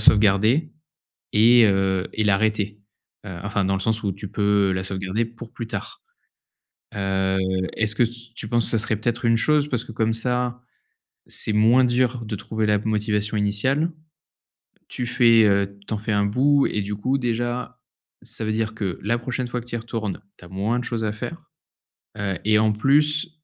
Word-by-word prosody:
sauvegarder 110 +9 +4 0.6
et 115 +2 +7
heu, 95 -1 +1
et 110 - 0
l'arrêter. 105 0 +1 0.5
Heu, 95 -3 -7
enfin, 100 -1 0
dans 95 - +1
le 95 - -2
sens 110 +2 0
où 100 -2 -1
tu 100 +1 -8
peux 100 -2 +2
la 95 0 -1
sauvegarder 95 +4 -2
pour 115 0 -12
plus 115 - -6
tard. 395 - -7 0.9
Heu, 95 -1 0 0.4
est-ce 110 -1 0
que 120 - +2
s 120 0 -8
tu 105 - -6
penses 120 0 +1
que - - -2
ça 115 - +2
serait 110 0 0
peut-être 120 +2 -2
une 115 0 +4
chose 150 +3 +2
parce 125 -3 -1
que 110 - -10
comme 110 0 0
ça, 125 +1 -1 0.7
c'est 110 - -2
moins 115 +4 +5
dur 125 -1 +1
de 105 -1 -3
trouver 110 +1 -2
la 105 -1 +3
motivation 105 0 -1
initiale? 130 +11 +1 1.0
Tu 125 - -4
fais, 115 -2 +5
heu, 100 0 +1
tu - - -3
en - - -1
fais 110 +1 -3
un 100 0 +2
bout 140 +7 +3
et 105 - -2
du 105 +1 -4
coup, 130 +6 0
déjà, 120 +1 -2 0.4
ça 110 - -5
veut 110 - -1
dire 110 -1 -2
que 95 -5 -3
la 115 +3 +1
prochaine 125 +1 -3
fois 120 0 -3
que - - -15
tu - - -11
y - - 0
retournes, 110 -4 -4 0.2
tu 90 - -14
as - - -13
moins 100 +6 -1
de - - -4
choses 115 -2 -3
à 105 - 0
faire, 165 +10 -6 0.8
heu, 100 -3 -2
et 105 0 +4
en 110 -1 +3
plus, 150 +7 +3
110 Hz, 195 wpm, -23 LUFS, 105-120 Hz, 1.0 s, et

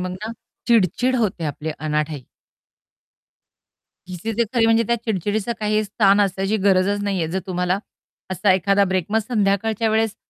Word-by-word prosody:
मग 185 0 -3
ना, 215 +5 -6 0.3
चिडचिड 235 +3 +2
होते 205 -8 -1
आपले 150 +1 -4
अनाठाई. 150 -2 -2 1.8
चिसीज 210 +6 -4
खरी 230 -1 +4
म्हणजे 225 0 +4
त्या 235 - +1
चिडचिडीचं 210 +1 -1
काही 215 0 +1
स्थान 205 0 +3
असायची 195 +2 0
गरजच 200 +1 +3
नाहीये, 195 -5 -1
जर 185 - -2
तुम्हाला 180 0 -1 0.5
असा 190 +1 +2
एखादा 195 +2 +3
ब्रेक 185 -2 -1
मग 220 - +3
संध्याकाळच्या 220 0 +1
वेळेस 220 0 0
200 Hz, 140 wpm, -21 LUFS, 185-220 Hz, 1.8 s, खरी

